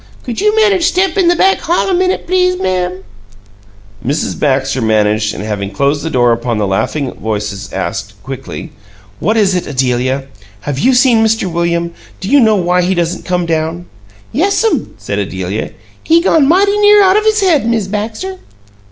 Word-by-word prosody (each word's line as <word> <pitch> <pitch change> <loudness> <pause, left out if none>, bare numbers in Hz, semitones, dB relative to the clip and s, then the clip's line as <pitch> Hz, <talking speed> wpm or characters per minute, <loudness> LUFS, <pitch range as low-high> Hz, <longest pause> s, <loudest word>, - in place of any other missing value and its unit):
"Could 240 +4 -4
you 425 +1 +2
manage 405 -5 +3
step 370 0 +1
in 380 -3 +2
the 350 - +4
back 385 +2 +3
hall 345 +4 0
a 385 - 0
minute, 370 +1 0
please, 365 0 +1
ma'am?" 185 - -2 1.0
Mrs. 145 +5 -2
Baxter 135 -2 0
managed 110 -1 +1
and, 100 - -6
having 105 -2 -3
closed 140 +8 0
the 165 - -3
door 120 -4 +2
upon 115 0 -1
the 105 - 0
laughing 110 +8 -2
voices, 105 -2 -4
asked, 105 - -4
quickly 135 +5 -7 0.5
"What 215 +5 0
is 200 -3 +3
it, 180 - -2
Adelia? 130 0 -1 0.4
Have 135 +2 -4
you 260 - +3
seen 245 -3 +4
Mr. 220 -2 +1
William? 170 -1 -1 0.3
Do 190 - -5
you 285 - +6
know 220 -4 +4
why 180 -1 +1
he 185 +2 0
doesn't 175 +1 -2
come 180 -1 -1
down?" 165 +1 -2 0.5
"Yes'm," 400 - 0
said - - -4
Adelia. - - -3 0.3
"He 330 +1 +4
gone 320 -5 +3
mighty 400 +5 +3
near 415 0 +6
out 390 +3 +3
his 435 -1 +2
head, 315 - +2
Miz 220 -4 0
Baxter." 220 - -4
185 Hz, 175 wpm, -14 LUFS, -, 1.0 s, you